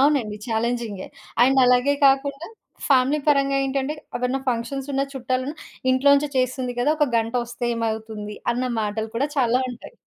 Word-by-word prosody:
అవునండి. 270 -7 +2
చాలెంజింగే. 230 -3 -2 0.4
అండ్ 265 +2 +4
అలాగే 250 +3 +4
కాకుండా, 275 +3 +1 0.4
ఫ్యామిలీ 270 +2 +4
పరంగా 275 -1 +3
ఏంటంటే 270 +2 -1 0.2
ఎవరన్నా 250 +2 -1
ఫంక్షన్స్ 255 +3 -2
ఉన్న, 270 0 +1
చుట్టాలన్నా, 260 +3 -2 0.3
"ఇంట్లో 260 +2 +3
నుంచే 285 +1 +1
చేస్తుంది 255 0 -1
కదా! 255 - +2
ఒక 295 -1 +3
గంటొస్తే 235 +1 -2
ఏమవుతుంది" 220 -2 -4 0.2
అన్న 245 +2 -2 0.2
మాటలు 215 +1 -2
కూడా 280 +5 0
చాలా 250 -1 +3
ఉంటాయి. 240 - -11
255 Hz, 145 wpm, -23 LUFS, 230-275 Hz, 0.4 s, అండ్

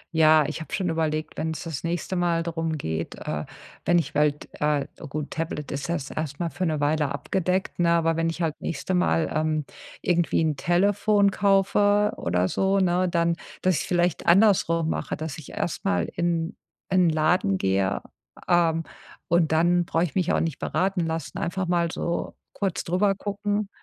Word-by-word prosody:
Ja, 155 -1 +6
ich 155 - -4
habe 160 - -9
schon 185 -2 0
überlegt, 155 -1 -2
wenn's 160 0 -3
das 165 -2 -5
nächste 175 +2 -2
Mal 170 -1 +1
drum 165 -1 -2
geht, 80 - -4
äh, 75 0 -4 0.4
wenn 175 - +4
ich 145 -4 -1
halt 150 0 +1
äh, 150 -2 +1 0.2
gut, 150 +1 -5
Tablet 160 -3 -4
ist 140 0 -3
jetzt 165 -5 -3
erstmal 155 +2 -3
für 185 - -3
'ne 155 -3 -1
Weile 150 -1 +1
abgedeckt, 185 0 -1
ne? 170 -1 +3
Aber 165 -1 +2
wenn 165 0 +1
ich 165 +2 -5
halt 160 -2 0
nächste 165 +4 -3
Mal, 180 -2 +2
ähm, 155 0 0 0.4
irgendwie 175 -2 +1
'n 155 -3 0
Telefon 200 +3 +3
kaufe 205 +1 +3
oder 90 +1 0
so, 195 +1 +1
ne, 185 0 +2
dann 170 -1 +1 0.2
dass 185 -1 +2
ich - - -1
es - - -7
vielleicht 175 -2 +1
andersrum 170 -4 +4
mache. - - -2
Dass 155 -3 -5
ich 155 - -10
erstmal 90 - -1
in 170 -1 -1 0.3
in 185 -2 +4
Laden 155 - +2
gehe, 95 0 0 0.5
ähm, 165 -2 +3 0.5
und 170 -2 +3
dann 175 +2 +3
brauche 165 0 +1
ich 165 -6 -3
mich 185 -3 +1
auch - - +2
nicht 165 -4 -2
beraten 190 0 0
lassen. 160 0 -4
Einfach 185 +2 -2
mal 170 -1 +1
so 170 +1 -3 0.2
kurz 195 -4 -2
drübergucken. 205 +2 0
165 Hz, 175 wpm, -25 LUFS, 155-180 Hz, 0.5 s, Ja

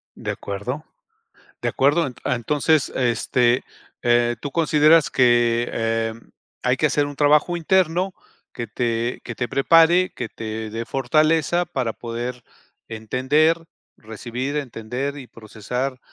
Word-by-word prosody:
De - - -4
acuerdo 115 +10 -5 0.8
de - - 0
acuerdo, 145 +2 +2 0.2
entonces 145 +4 +1
este, 120 0 +1 0.4
eh, 120 -1 +2
tú 145 - -4
consideras 155 0 +4
que, 120 -1 +3
eh, 115 0 -1 0.5
hay 125 0 +2
que 155 - -3
hacer 145 -1 +2
un 145 - -8
trabajo 150 +4 +3
interno, 180 +2 +1 0.4
que 120 - -5
te 115 +2 -2
que 120 - -6
te 120 0 -3
prepare, 165 +6 +4
que 115 - -5
te 110 0 -6
dé 115 +2 -5
fortaleza 155 +6 +1
para 125 -8 -3
poder 120 +1 -6 0.4
entender, 130 +9 +1 0.4
recibir, 120 +6 -5
entender 130 +1 -4
y 135 -3 -9
procesar 125 +5 -5
125 Hz, 125 wpm, -22 LUFS, 115-150 Hz, 0.8 s, consideras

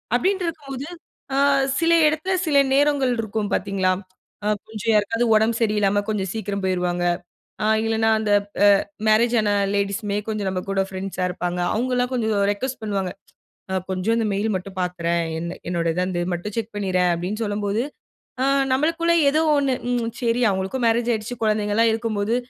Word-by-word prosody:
அப்பிடின்டு 375 +7 +1
இருக்கும்போது, 280 -3 -6 0.5
அ - - +1 0.4
சில 335 0 +3
இடத்துல 310 +5 0
சில 290 -2 +3 0.2
நேரங்கள் 280 -3 +3
இருக்கும் 215 -1 -2
பார்த்தீங்களா, 195 -2 +1 0.5
அ - - +1 0.2
கொஞ்சம் 220 +1 -2
யாருக்காவது 230 +3 +2
உடம்பு 220 +2 +2
சரியில்லாமல 205 -2 +2
கொஞ்சம் 195 -3 -1
சீக்கிரம் 200 -2 -3
போயிருவாங்க. 180 -1 0 0.6
அ - - +2 0.2
இல்லன்னா 225 0 +2
அந்த 210 -1 0 0.3
அ - - +8 0.4
மேரேஜ் 230 +2 +4
ஆன 210 - +1 0.2
லேடீஸுமே 200 +1 -1
கொஞ்சம் 210 -3 -2
நம்ம 185 -1 -3
கூட 195 0 +2
ஃப்ரெண்ட்ஸா 190 -1 -3
இருப்பாங்க. 180 0 -3
அவுங்கல்லாம் 250 +2 0
கொஞ்சம் 220 -3 0 0.2
ரிக்வொஸ்ட் 255 +3 -5
பண்ணுவாங்க. 195 -3 -2 0.6
அ - - 0 0.2
கொஞ்சம் 190 +5 0
இந்த 225 - 0
மெயில் 210 +2 0
மட்டும் 185 +1 -8
பார்த்துறேன்! 170 -1 -1 0.2
என்ன, 170 +1 -5
என்னோட 170 -1 -1
இத 180 - 0
வந்து 175 -2 -2
மட்டும் 200 +5 -6
செக் 225 -1 -3
பண்ணிறேன், 185 -3 +1
அப்பிடின்னு 190 +7 -3
சொல்லும்போது, 205 +1 -1 0.6
அ - - +3 0.3
நம்மளுக்குள்ளே 330 +5 +2
ஏதோ 305 +3 +2 0.2
ஒன்னு, 275 -2 +2 0.2
ம், 235 -2 0
சரி 235 0 +1
அவுங்களுக்கும் 190 +6 -2
மேரேஜ் 235 +1 +2
ஆயிடுச்சு, 220 +2 -3
குழந்தைங்கலாம் 215 +1 +2
இருக்கும்போது, 220 -1 -1
215 Hz, 155 wpm, -22 LUFS, 195-240 Hz, 0.6 s, அ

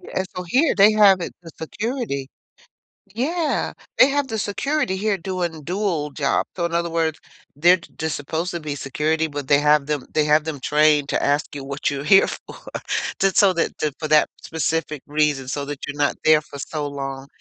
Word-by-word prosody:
Yeah, 190 - -3
so 180 - -3
here, 265 - +2
they 205 +2 +6
have 200 -3 +6
it, - - -5
the 165 - -11
security. 205 - -4 0.9
Yeah. 305 +7 -1 0.2
They 260 - +8
have 285 0 0
the 220 -3 -3
security 255 +2 -1
here 205 0 0
doing 175 -3 -4
dual 175 -5 -2
job. 140 -1 0
So 175 - -1
in 170 - -3
other 170 0 0
words, 165 -1 -1 0.4
they're 175 +5 +5
j 170 - -17
just 160 -1 -2
supposed 160 +5 -3
to 170 - -4
be 150 -2 -5
security, 155 +4 -1
but 145 -3 -6
they 145 0 +5
have 150 -1 +3
them 145 -4 -2
they 155 - +3
have 150 +1 +4
them 155 -3 -5
trained 150 0 +3
to - - 0
ask 145 +1 0
you 140 - -6
what 140 +1 -2
you're 140 -1 -4
here 195 +4 +6
for. - - -8 0.6
Just 195 -1 +2
so 200 -3 +6
that 170 - -1
that 150 -3 -1
for 155 - -3
that 155 0 +4
specific 160 -2 -2
reason 145 -3 0
so 140 +1 -3
that 145 -1 -6
you're 145 0 -6
not 145 -1 +1
there 155 -1 +5
for 140 -2 -11
so 150 0 -4
long. 135 -1 -6
160 Hz, 205 wpm, -22 LUFS, 145-190 Hz, 0.9 s, They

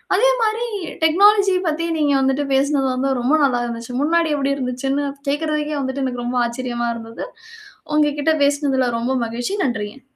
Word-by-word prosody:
அதே - - +4 0.3
மாதிரி 460 -3 -4 0.2
டெக்னாலஜி 395 +4 +5
பத்தி 320 +2 -1
நீங்க 295 -2 +2
வந்துட்டு 270 +2 +1
பேசினது 275 0 +2
வந்து 260 +2 -1
ரொம்ப 250 +5 +2
நல்லா 250 -3 +2
இருந்துச்சு. 235 +1 -6
முன்னாடி 330 +2 +2
எப்படி 275 -1 0
இருந்துச்சுன்னு 270 +2 -2 0.2
கேக்குறதுக்கே 300 +1 -1
வந்துட்டு 265 +1 -3
எனக்கு 245 -2 -3
ரொம்ப 245 +1 -2
ஆச்சரியமா 240 0 -3
இருந்தது. 230 0 -7 0.7
உங்ககிட்ட 295 +1 +2
பேசினதில 280 -3 +1
ரொம்ப 240 +3 -1
மகிழ்ச்சி. 240 - -3
நன்றிங்க. 240 0 -3
275 Hz, 150 wpm, -20 LUFS, 250-305 Hz, 0.7 s, டெக்னாலஜி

